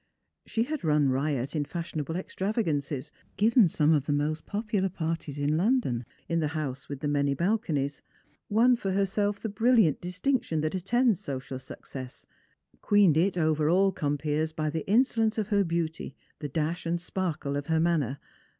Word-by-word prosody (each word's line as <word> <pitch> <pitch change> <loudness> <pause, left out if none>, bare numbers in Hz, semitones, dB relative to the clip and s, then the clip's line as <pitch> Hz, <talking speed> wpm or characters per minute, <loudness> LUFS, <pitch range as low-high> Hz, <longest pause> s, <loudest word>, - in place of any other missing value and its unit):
She 225 - 0
had 305 +3 -4
run 150 -3 +3
riot 135 +1 -1
in 150 - +1
fashionable 165 0 -4
extravagances; 170 - -2 0.3
given 225 0 +5
some 150 0 +3
of 145 -3 +1
the - - +1
most 150 +2 -1
popular 205 -2 -1
parties 165 -4 -4
in 145 +1 +1
London, 180 - +1 0.2
in 165 - 0
the 155 - +1
house 140 -3 -4
with 140 -2 -6
the 150 - -1
many 140 -1 +1
balconies; 165 - -1 0.5
won 235 +4 +5
for 195 -5 -2
herself 200 +1 0
the - - -3
brilliant 220 - +3
distinction 180 - -1
that 155 0 -1
attends 220 +3 +2
social 130 -1 -5
success; 130 0 -9 0.6
queened 205 -7 +4
i\ 175 +5 +3
over 155 -1 +2
all 190 +3 +4
compeers 150 0 -1
by 155 -1 -1
the 160 0 -4
insolence 225 -1 +3
of 215 -2 -1
her 200 -2 +3
beauty, 165 -4 -3 0.2
the 145 - -4
dash 165 +4 -2
and 170 +1 0
sparkle 170 -5 -3
of 145 0 -3
her 160 -1 +2
manner. 155 -6 +1
165 Hz, 165 wpm, -28 LUFS, 145-200 Hz, 0.6 s, given